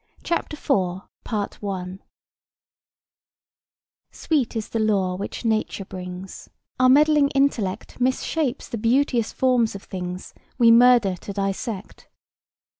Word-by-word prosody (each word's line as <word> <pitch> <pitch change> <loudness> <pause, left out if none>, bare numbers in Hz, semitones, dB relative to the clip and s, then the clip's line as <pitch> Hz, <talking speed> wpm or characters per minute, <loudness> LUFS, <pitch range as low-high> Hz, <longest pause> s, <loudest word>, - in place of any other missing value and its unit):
CHAPTER 340 -2 -2
IV 190 -3 -3 2.1
"Sweet 280 -7 -1
is 220 -1 -3
the 225 - -2
lore 195 -4 +1
which 200 +5 -6
Nature 215 -3 -1
brings; 185 0 -8 0.3
Our 255 0 +5
meddling 295 +1 +5
intellect 235 -6 0
Mis 260 +1 +1
shapes 295 -5 -2
the 230 - -5
beauteous 240 0 +1
forms 250 -5 +1
of 195 - -8
things 180 -1 -6 0.2
We 235 -2 +6
murder 235 -5 +6
to 200 - -8
dissect. 195 +1 -4
220 Hz, 110 wpm, -23 LUFS, 190-255 Hz, 2.1 s, We